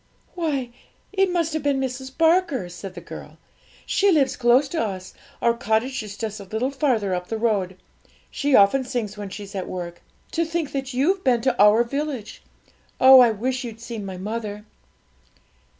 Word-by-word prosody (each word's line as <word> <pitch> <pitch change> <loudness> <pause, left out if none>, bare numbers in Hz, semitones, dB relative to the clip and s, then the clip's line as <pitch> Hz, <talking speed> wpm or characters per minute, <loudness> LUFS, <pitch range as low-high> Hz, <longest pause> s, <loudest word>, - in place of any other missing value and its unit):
'Why, 285 -8 -2 0.4
it 390 -1 +2
must 335 -3 0
have 315 - -1
been 285 -1 +1
Mrs 265 0 -5
Barker!' 325 - +2
said 180 +2 -9
the 175 - -8
girl. - - -10 0.5
'She 400 0 +2
lives 285 -6 +2
close 250 +3 +4
to 330 - -1
us; 190 -3 -5 0.3
our 235 - +4
cottage 235 +2 -1
is 205 -1 -8
just 215 -2 -4
a - - -8
little 220 +7 -2
farther 245 -9 0
up 180 0 -3
the 225 - -3
road. 200 -5 0 0.5
She 285 -2 +1
often 200 +7 +5
sings 240 -5 -3
when 205 -1 -6
she's 200 0 -8
at 190 -2 -4
work. 175 -1 -6 0.3
To 335 - 0
think 325 -2 -3
that 270 -2 -4
you've 365 +9 +1
been 245 -3 +3
to 260 0 +1
our 210 +3 +6
village! 275 -3 -4 0.6
Oh, 260 0 +9
I 245 -2 +7
wish 250 +4 -2
you'd 230 -2 -7
seen 230 -2 -6
my 190 -2 -6
mother!' 210 +1 -5
240 Hz, 180 wpm, -23 LUFS, 205-275 Hz, 0.6 s, Oh